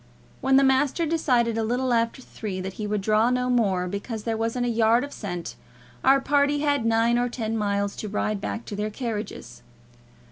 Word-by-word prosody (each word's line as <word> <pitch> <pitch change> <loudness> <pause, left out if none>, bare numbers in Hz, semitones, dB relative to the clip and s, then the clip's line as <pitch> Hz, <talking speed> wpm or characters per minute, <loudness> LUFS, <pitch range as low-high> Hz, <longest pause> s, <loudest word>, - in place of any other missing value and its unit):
When 270 0 +3
the 275 - +5
master 275 +5 +2
decided 245 -8 +1
a - - 0
little 245 +3 0
after 230 +2 0
three 200 -6 -6
that 190 +1 -5
he 210 - -2
would 210 -1 -1
draw 215 +3 +3
no 250 0 0
more, 195 -7 +1
because 210 +3 -5
there 225 0 -1
wasn't 230 +2 -1
a - - 0
yard 230 +1 +3
of 285 - -7
scent, 175 -5 -5 0.5
our 270 +1 +5
party 285 +1 +2
had 285 -5 +1
nine 230 +1 +3
or 245 0 0
ten 225 -2 -3
miles 200 -2 -1
to 215 - -5
ride 210 0 -1
back 225 +3 -4
to 205 - -6
their 210 +1 -2
carriages. 220 -1 -6
230 Hz, 200 wpm, -25 LUFS, 210-255 Hz, 0.5 s, the